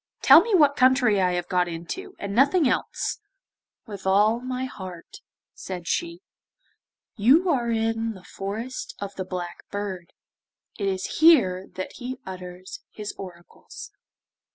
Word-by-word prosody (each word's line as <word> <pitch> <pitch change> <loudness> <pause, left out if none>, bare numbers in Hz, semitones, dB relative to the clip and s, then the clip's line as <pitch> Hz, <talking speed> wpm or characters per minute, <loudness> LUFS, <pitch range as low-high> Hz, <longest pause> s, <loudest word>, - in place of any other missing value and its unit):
Tell - - +9
me 450 -4 +1
what 290 -5 +5
country 255 -6 +4
I 180 -1 +2
have 175 -1 -2
got 180 -1 +1
into, 175 - -7
and 200 0 -5
nothing 280 - +4
else.' - - -2 0.7
'With 200 -3 -8
all 210 +4 +4
my 255 +1 -4
heart,' 185 -8 -9 0.3
said 180 -3 -7
she. 340 +1 -2 1.0
'You 285 - +4
are 240 -5 0
in 225 0 0
the 185 - -13
Forest 215 +8 -6
of 200 0 -6
the 190 -1 -5
Black 180 -1 -6
Bird; 190 -4 -5 0.7
it 200 - -1
is 190 -1 -3
here 200 - +5
that 185 - -5
he 255 0 -6
utters 180 0 -8
his 210 -1 -7
oracles. 175 -3 -11
205 Hz, 140 wpm, -25 LUFS, 185-255 Hz, 1.0 s, Tell